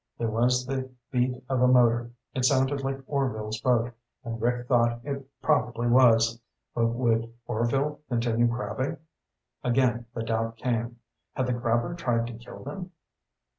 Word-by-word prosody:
There 115 -1 -1
was 125 +3 +2
the 130 0 -3 0.2
beat 125 0 0
of 130 -1 0
a 125 - +6
motor. 120 -2 +4 0.2
It 130 - -1
sounded 135 +1 +3
like 135 0 -2
Orvil's 110 -6 -2
boat, 120 0 +2 0.3
and 115 -1 -5
Rick 120 +1 0
thought 120 -2 +3
it 140 -1 -5 0.2
probably 120 0 +1
was. 115 -2 +5 0.3
But 115 -1 +2
would 115 -1 +1 0.2
Orvil 135 +6 0
continue 120 -1 +2
crabbing? 130 +5 -2 0.7
Again 120 -1 +2
the 115 - -2
doubt 115 0 -1
came. 120 0 -2 0.4
Had 130 - 0
the 125 - 0
crabber 120 +3 0
tried 120 -9 0
to 120 - -6
kill 120 +1 -11
them? 190 -2 -6
120 Hz, 150 wpm, -27 LUFS, 115-130 Hz, 0.7 s, a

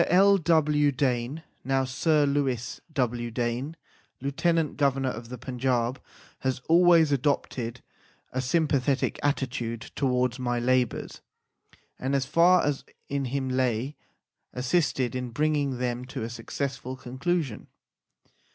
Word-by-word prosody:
L. 195 +2 +5
W. 150 -3 +3
Dane 130 +2 -1 0.2
(now 135 +1 +1
Sir 145 +3 +2
Louis 135 -4 -1
W. 120 -4 -1
Dane, 120 +6 -2 0.4
Lieu 140 +2 -2
tenant 165 +1 +1
Go 140 -2 +4
vernor 135 -1 -2
of 115 +1 -8
the 125 - -6
Panjab) 125 0 -1 0.4
has 130 -1 -1
always 170 -2 +6
adopted 125 -3 -1 0.5
a 130 - -1
sympathetic 140 -2 +1
attitude 125 -5 -2
towards 125 -2 +1
my 120 -1 0
labours, 125 0 0 0.8
and, 135 +2 0
as 135 -1 +1
far 170 +6 +5
as 145 -2 -1 0.3
in 140 -1 -1
him 130 +1 -2
lay, 130 +1 0 0.6
assisted 130 -1 +1
in 125 -1 -3
bringing 145 0 0
them 125 0 -2
to 125 - -5
a 115 - -4
successful 130 +2 -4
conclusion. 130 +1 -2
130 Hz, 125 wpm, -27 LUFS, 125-145 Hz, 0.8 s, always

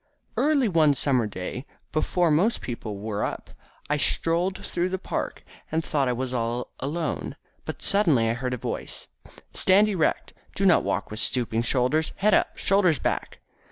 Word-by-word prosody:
Early 285 -4 +3
one 155 -6 +4
summer 130 -4 +1
day, 100 +7 -6 0.2
before 170 +2 +1
most 190 +10 +2
people 115 -4 -5
were 105 0 -3
up, - - -4 0.4
I 150 - +1
strolled 170 +5 0
through 175 +1 -1
the 190 - -2
park. 190 - -4 0.3
I 160 - +1
thought 145 -4 0
I 125 - +1
was 130 +1 -3
all 120 0 -2
alone, 155 +4 -3 0.3
but - - -6
suddenly 160 - +4
I 115 - +1
heard 125 +1 -2
a - - -7
voice, - - -5 0.4
"Stand 205 +3 +4
erect. 180 -7 0 0.2
Do 195 - 0
not 180 -4 +5
walk 105 - -2
with 110 - -5
stooping 115 -2 +1
shoulders. 130 +6 +1
Head 210 +1 +2
up, - - +2
shoulders 185 -5 +3
back!" - - -3
150 Hz, 165 wpm, -25 LUFS, 120-180 Hz, 0.4 s, not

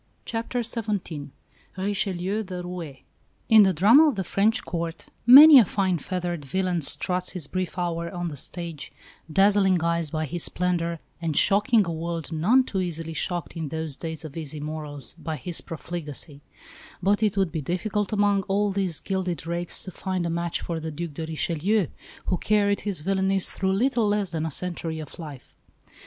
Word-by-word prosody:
CHAPTER 235 +2 -2
XVII 205 - -3 0.5
RICHELIEU, 195 0 -1
THE 185 -3 -6
ROUÉ 170 -6 -7 0.5
In 220 -1 +8
the 195 -2 +5
drama 220 - +6
of 285 - +1
the 190 - -2
French 205 +5 +1
Court 165 -1 -4 0.2
many 285 +3 +11
a - - +7
fine 185 -2 0
feathered 175 -1 -3
villain 180 +4 -1
"struts 180 +5 -1
his 180 -6 -5
brief 185 +4 -4
hour" 170 -1 -2
on 175 -1 -3
the 150 - -7
stage, 165 +2 -6 0.4
dazzling 195 -1 +4
eyes 170 -1 0
by 155 +1 -2
his 170 +3 -4
splendour, 170 -2 -1 0.2
and 160 -3 -2
shocking 210 +2 +4
a 170 - -3
world 165 -1 -4
none 205 +12 +4
too 200 -6 -3
easily 165 -2 -4
shocked 175 +2 -3
in 160 -3 -4
those 160 -1 -4
days 160 0 -6
of 150 - -9
easy 155 -2 -4
morals 150 -2 -4
by 160 -2 -4
his 160 +5 -4
profligacy; 155 -3 -6 0.6
but 205 +3 +2
it 210 -2 +1
would 190 -4 +2
be 160 - -3
difficult 195 +6 -2
among 205 -1 +2
all 205 +1 +1
these 190 -5 -1
gilded 185 -5 -3
rakes 170 +1 -2
to 185 - -7
find 185 0 -3
a 170 - -1
match 170 0 -1
for 165 -1 -3
the 160 0 -5
Duc 160 +1 -5
de 160 +2 -5
Richelieu, 170 +5 0 0.4
who 180 - 0
carried 205 -1 +2
his 200 -7 -2
villainies 190 +2 +1
through 190 0 0
little 235 +1 +2
less 205 -3 0
than 160 -1 -2
a - - -2
century 165 0 -4
of 155 +1 -9
life. 150 -6 -9
175 Hz, 175 wpm, -25 LUFS, 160-195 Hz, 0.6 s, many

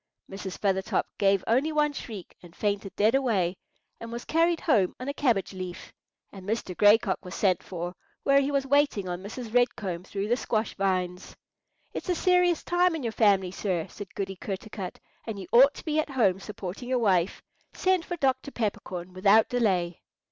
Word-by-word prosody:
Mrs. 195 -1 -7
Feathertop 190 -2 0
gave 195 -1 +3
only 265 +8 +2
one 300 -1 +2
shriek 215 -9 -8
and 175 -1 -15
fainted 200 -2 -2
dead 215 +3 +3
away, 210 -10 +1 0.4
and 230 0 -8
was 235 +1 -6
carried 330 +1 +2
home 205 - +2
on 255 - -6
a 280 - -1
cabbage 240 -10 +1
leaf; 185 -1 -7 0.4
and 195 -2 -11
Mr. 205 -2 -3
Gray 205 +3 +7
Cock 195 -5 -3
was 180 -1 -8
sent 185 -4 +2
for, 175 -1 -5 0.3
where 275 0 +5
he 275 - 0
was 275 -1 0
waiting 280 -8 +2
on 175 0 -4
Mrs. 220 +3 -7
Red 245 0 +3
Comb 180 -4 -4
through 200 +2 -4
the 240 - +3
squash 220 -4 -1
vines. 185 -2 -2 0.6
"It's - - -5
a 360 - +2
serious 360 -1 +3
time 355 -1 +2
in 310 - -5
your 230 - -1
family, 200 -5 +3
sir," 180 -4 -2
said 205 -2 -10
Goody 195 -1 -4
Kertarkut, 195 0 -6 0.3
"and 220 -2 -4
you 190 - -6
ought 270 +4 +7
to - - -10
be 310 -1 +1
at 310 - -1
home 210 -9 +2
supporting 205 +3 -7
your 255 - +2
wife. 190 -6 +1 0.3
Send 370 -2 +1
for 350 0 -5
Dr. 265 -2 0
Peppercorn 190 -7 -4
without 200 +4 +4
delay." 185 -8 0
210 Hz, 190 wpm, -27 LUFS, 190-265 Hz, 0.6 s, Gray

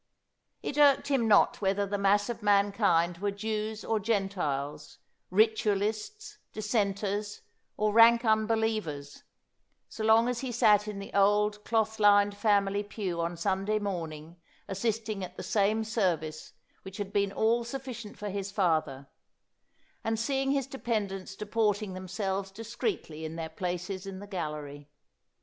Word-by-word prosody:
It 290 - -3
irked 285 -1 +5
him 260 -5 +2
not 210 0 +4
whether 200 +1 +1
the 200 0 -3
mass 205 +1 +3
of 235 -1 -5
mankind 200 -4 +2
were 205 +1 0
Jews 215 +1 -3
or 220 -1 +1
Gentiles, 180 -10 -2 0.3
Ritual 210 0 +2
ists, 420 - -5
Dissenters, 205 -1 -1 0.4
or 210 0 +1
rank 230 +1 +7
unbelievers, 220 -9 0 0.7
so 220 - -6
long 220 +2 +5
as 250 -1 -1
he 260 -1 -4
sat 215 -3 +4
in 210 -1 -5
the 200 - -8
old 210 +1 +2
cloth 220 -1 0
lined 205 -1 +5
family 205 -1 +2
pew 200 -4 -4
on 170 +1 -3
Sunday 195 +4 0
morning 165 -5 -5 0.3
assisting 215 0 -2
at 180 - -8
the - - -5
same 215 +1 +1
service 175 -9 -2 0.3
which 190 0 -10
had 200 -1 -5
been 200 -1 +1
all 230 +3 +2
sufficient 240 -3 -7
for 210 - -5
his 200 0 -4
father, 160 -8 0 1.0
and 225 0 -1
seeing 270 +3 0
his 275 -1 +1
dependents 210 -8 -3
deporting 210 -1 -1
themselves 190 +1 -3
discreetly 225 - -4
in 160 0 -5
their 165 -1 -4
places 180 +1 -4
in 195 -1 -6
the 200 - -8
gallery. 150 -6 -6
205 Hz, 140 wpm, -29 LUFS, 190-220 Hz, 1.0 s, rank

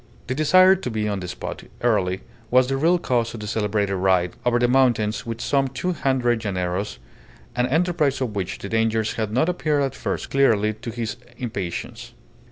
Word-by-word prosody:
The 130 - -2
desire 185 +7 +6
to 180 -9 -5
be 110 -2 -1
on 100 -2 -1
the 90 - -6
spot - - -6 0.2
early 95 -6 +1 0.3
was 130 +1 +5
the 135 +1 -1
real 165 +5 +3
cause 120 -8 -1
of - - -7
the 105 - -6
celebrated 105 -2 0
ride 90 -1 +2
over 120 0 +2
the 120 0 +3
mountains 120 -4 +2
with 115 0 -4
some 135 +2 +1
two 135 +8 -2
hundred 125 -6 +1
llaneros, 95 0 -2 0.6
an 125 0 +1
enterprise 160 -1 +1
of 120 -5 -3
which 95 -3 -3
the - - -7
dangers 110 0 +1
had 110 -2 -2
not 130 +8 +2
appeared 150 -4 +1
at 135 -2 -1
first - - -4
clearly 110 -6 +3
to 110 +2 -8
his 115 0 -4 0.2
impatience. 100 -8 -5
120 Hz, 185 wpm, -23 LUFS, 105-135 Hz, 0.6 s, desire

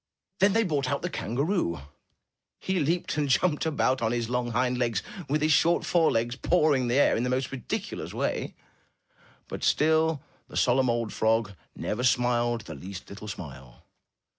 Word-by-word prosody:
Then 200 +1 +4
they 225 +1 +3
brought 145 -8 -1
out 140 +2 -2
the 180 - -2
kangaroo. 120 - -1 0.8
He 190 -1 -1
leaped 165 +2 -1
and 145 -2 0
jumped 150 +3 +2
about 130 -4 +1
on 115 -1 +1
his 120 -1 -2
long 125 -1 0
hind 125 +1 0
legs, 115 -5 0 0.3
with 150 +2 +1
his 155 - +3
short 170 +3 +3
forelegs 120 -8 +2
pawing 150 -5 +2
the 120 - +1
air 145 - +4
in - - 0
the 125 - -1
most 130 +1 -1
ridiculous 135 -4 -4
way, - - -2 0.9
but - - -7
still 160 -1 +2 0.2
the - - -7
solemn 130 0 +3
old 115 -2 -1
frog 110 -1 +1 0.2
never 120 +4 -3
smiled 120 -1 +2
the 85 - -9
least 95 +7 -9
little 100 +2 -9
smile. 65 - -9
125 Hz, 165 wpm, -27 LUFS, 115-155 Hz, 0.9 s, Then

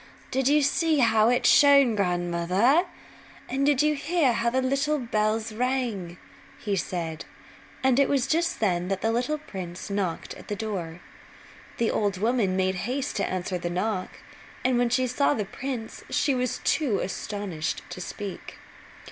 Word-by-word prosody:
"Did 265 0 +1
you 295 +1 +4
see 315 +3 +2
how 225 -3 +4
it 245 0 +1
shone, 280 -5 +6
grandmother? 180 - +2 0.6
And 275 +2 0
did 290 -1 +3
you 300 0 +3
hear 300 -2 +1
how 230 +1 +1
the 255 +2 0
little 275 +4 +1
bells 220 -3 -1
rang?" 230 -8 -2 0.4
he 205 -2 -2
said; 165 -3 -3 0.6
and 260 0 +4
it 280 - +4
was 275 -3 +2
just 335 +2 0
then 180 -4 +1
that 195 0 -2
the 225 - +2
little 250 +6 0
prince 185 - -7
knocked 190 -5 -2
at - - -13
the 205 - -3
door. 185 -6 -5 0.8
The 230 - +1
old 205 -2 0
woman 215 -2 +1
made 190 0 +1 0.2
haste 275 +2 -2
to 200 - 0
answer 185 0 -3
the 175 - -3
knock 185 +2 -2 0.6
and 255 -1 +3
when 245 -1 +2
she 255 +2 +2
saw 280 +4 +1
the 210 - -2
prince 240 +2 -6
she 280 - +1
was 250 -1 -2
too 265 -10 +1
astonished 190 -5 -4
to 180 - -6
speak. 200 +1 -7
225 Hz, 165 wpm, -26 LUFS, 190-265 Hz, 0.8 s, shone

